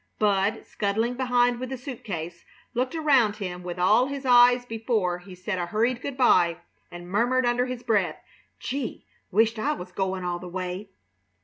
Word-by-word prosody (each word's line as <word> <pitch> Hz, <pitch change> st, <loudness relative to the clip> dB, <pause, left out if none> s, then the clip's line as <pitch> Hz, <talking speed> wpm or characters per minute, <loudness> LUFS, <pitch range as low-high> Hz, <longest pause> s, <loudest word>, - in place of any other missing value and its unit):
Bud, 205 Hz, 0 st, +1 dB
scuttling 220 Hz, +4 st, -1 dB
behind 245 Hz, -1 st, +2 dB
with 255 Hz, 0 st, -5 dB
a 265 Hz, -, -3 dB
suit 250 Hz, -1 st, -8 dB
case, 170 Hz, -3 st, -6 dB, 0.3 s
looked 255 Hz, +4 st, -1 dB
around 270 Hz, -9 st, +3 dB
him 180 Hz, -4 st, -5 dB
with 180 Hz, 0 st, -6 dB
all 210 Hz, +8 st, +4 dB
his 275 Hz, -1 st, -5 dB
eyes 245 Hz, 0 st, +6 dB
before 220 Hz, -6 st, -1 dB
he 180 Hz, +1 st, -12 dB
said 185 Hz, +1 st, -3 dB
a 175 Hz, -, -2 dB
hurried 235 Hz, +6 st, 0 dB
good 275 Hz, -1 st, -5 dB
by, 175 Hz, -9 st, +4 dB, 0.3 s
and 175 Hz, 0 st, -10 dB
murmured 245 Hz, +7 st, +2 dB
under 245 Hz, +1 st, +1 dB
his 250 Hz, -1 st, -5 dB
breath: 215 Hz, -6 st, +1 dB, 0.4 s
"Gee! 270 Hz, -2 st, -4 dB, 0.2 s
Wisht 220 Hz, +3 st, +2 dB
I 295 Hz, +7 st, +1 dB
was 180 Hz, -9 st, -8 dB
goin' 190 Hz, 0 st, -2 dB
all 175 Hz, -1 st, -2 dB
the 180 Hz, -, -8 dB
way!" 185 Hz, +2 st, -5 dB
220 Hz, 180 wpm, -26 LUFS, 180-250 Hz, 0.4 s, eyes